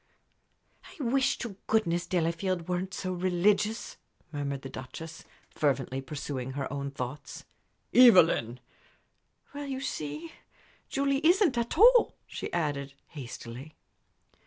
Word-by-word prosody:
"I 310 Hz, -, -9 dB
wish 265 Hz, +2 st, +2 dB
to 220 Hz, -6 st, -6 dB
goodness 175 Hz, -6 st, +1 dB
Delafield 175 Hz, 0 st, -1 dB
weren't 180 Hz, +1 st, -2 dB
so 185 Hz, -1 st, -3 dB
religious," 190 Hz, +5 st, +1 dB, 0.3 s
murmured 140 Hz, -2 st, -3 dB
the 135 Hz, -, -6 dB
Duchess, 160 Hz, +6 st, -9 dB, 0.3 s
fervently, 135 Hz, -2 st, 0 dB
pursuing 135 Hz, -2 st, -5 dB
her 140 Hz, 0 st, -4 dB
own 140 Hz, 0 st, -3 dB
thoughts. 135 Hz, +1 st, -7 dB, 0.5 s
"Evelyn!" 170 Hz, -, +6 dB, 0.9 s
"Well, 290 Hz, 0 st, -5 dB
you 265 Hz, -1 st, -3 dB
see, 155 Hz, -, -5 dB, 0.6 s
Julie 275 Hz, +1 st, 0 dB
isn't, 345 Hz, -, +4 dB
at 235 Hz, +4 st, -2 dB
all," 480 Hz, +4 st, +7 dB
she -, -, -6 dB
added, 140 Hz, -4 st, -2 dB
hastily. 130 Hz, 0 st, -9 dB
170 Hz, 110 wpm, -29 LUFS, 140-235 Hz, 0.9 s, all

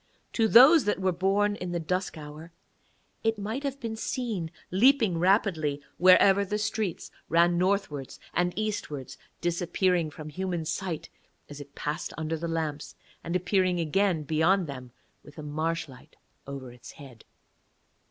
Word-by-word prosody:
To 225 Hz, -2 st, +2 dB
those 270 Hz, +8 st, +8 dB
that 210 Hz, -, 0 dB
were 190 Hz, -1 st, +1 dB
born 195 Hz, +3 st, +1 dB
in 180 Hz, -1 st, -5 dB
the 175 Hz, -, -1 dB
dusk 180 Hz, +2 st, -2 dB
hour 155 Hz, +2 st, -10 dB, 0.7 s
it 225 Hz, -1 st, +1 dB
might 215 Hz, +6 st, -4 dB
have 280 Hz, -1 st, -4 dB
been 230 Hz, -3 st, -4 dB
seen 220 Hz, -7 st, -3 dB, 0.2 s
leaping 220 Hz, -3 st, +4 dB
rapidly 170 Hz, -6 st, +2 dB, 0.2 s
wherever 190 Hz, +2 st, +6 dB
the 210 Hz, +2 st, -2 dB
streets 215 Hz, -4 st, -3 dB, 0.2 s
ran 170 Hz, +1 st, +3 dB
northwards 180 Hz, -8 st, -1 dB
and 175 Hz, +1 st, +1 dB
eastwards, 205 Hz, -11 st, -4 dB, 0.2 s
disappearing 175 Hz, 0 st, 0 dB
from 155 Hz, 0 st, -9 dB
human 175 Hz, 0 st, -3 dB
sight 165 Hz, 0 st, -4 dB, 0.4 s
as 145 Hz, 0 st, -9 dB
it 140 Hz, 0 st, -13 dB
passed 150 Hz, +1 st, -4 dB
under 160 Hz, 0 st, -2 dB
the 165 Hz, +1 st, -4 dB
lamps 155 Hz, -3 st, -3 dB, 0.3 s
and 170 Hz, +1 st, -3 dB
appearing 185 Hz, 0 st, +1 dB
again 170 Hz, 0 st, +1 dB
beyond 160 Hz, +5 st, +2 dB
them 130 Hz, -4 st, -8 dB, 0.3 s
with 145 Hz, -, -16 dB
a 155 Hz, -, -7 dB
marsh 155 Hz, +3 st, -2 dB
light 130 Hz, -2 st, -16 dB, 0.3 s
over 135 Hz, -3 st, -7 dB
its 120 Hz, 0 st, -13 dB
head. 130 Hz, -6 st, -13 dB
175 Hz, 150 wpm, -28 LUFS, 155-200 Hz, 0.7 s, those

